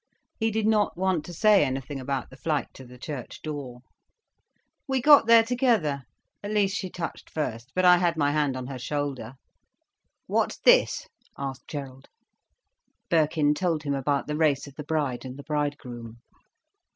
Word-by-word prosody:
He 225 0 +1
did 220 0 -1
not 215 -4 +2
want 185 -4 0
to - - -8
say 210 +2 +4
anything 135 0 -3
about 135 -1 -3
the - - -12
flight 150 0 -2
to 130 - -12
the 125 +1 -13
church 130 -1 -7
door. 140 -5 -6 1.1
"We 265 -1 +1
got 285 -2 +7
there 230 -1 +8
together. 225 - +1 0.4
At 205 - -6
least 205 -2 +1
she 185 - -3
touched 170 -1 -6
first, 120 -6 -4
but 185 0 +2
I 180 0 +8
had 175 -2 +1
my 145 -2 +2
hand 145 -3 0
on 130 - -5
her 130 0 -6
shoulder." 135 -2 -4 0.9
"What's - - 0
this?" - - +4 0.3
asked 135 -2 -6
Gerald. 135 -3 -7 1.0
Birkin 155 -2 +3
told 165 -2 -1
him 140 -1 -1
about 140 +1 0
the 150 - -3
race 150 -3 +2
of 140 - -12
the 150 - -7
bride 145 -5 -2
and 130 0 -8
the 140 - -9
bridegroom. 140 -7 -4
150 Hz, 165 wpm, -26 LUFS, 135-180 Hz, 1.1 s, there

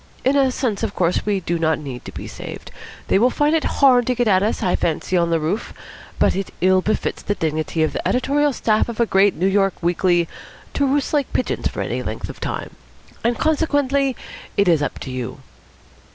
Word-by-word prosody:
In 265 +2 +3
a 275 -2 +4
sense, 245 -5 -2
of - - -2
course, 180 +3 0
we 200 -2 +1
do 170 -1 -2
not 160 -1 +2
need 130 -5 -8
to - - -7
be - - -7
saved. - - -9 0.4
They - - +3
will 245 +4 +4
find 295 +4 +1
it 320 - +1 0.2
hard 250 -3 +6
to 250 - +1
get 245 -1 +1
at 190 -3 +4
us, 210 +3 -1
I 180 - +2
fancy, 170 +3 -1
on 170 -1 +2
the 165 -1 +2
roof. 170 +8 -3 0.4
But - - +3
it 195 0 -3
ill 185 +1 +4
befits 215 - -1
the 205 - -2
dignity 155 0 -1
of 155 - 0
the - - -2
editorial 285 +3 +2
staff 220 -3 +1
of 235 - -6
a 235 - +4
great 195 -1 +3
New 180 - -1
York 195 -1 +2
weekly 175 0 +2 0.5
to 280 - +1
roost 280 +2 0
like 290 -3 +1
pigeons 255 - -1
for - - -4
any - - -2
length - - -5
of - - -9
time; - - -4 0.5
and 235 +1 +1
consequently 285 -4 +1 0.4
it 200 - +3
is 165 -4 +4
up 145 - -2
to 130 - -6
you." 125 -2 -5
200 Hz, 215 wpm, -21 LUFS, 170-260 Hz, 0.5 s, hard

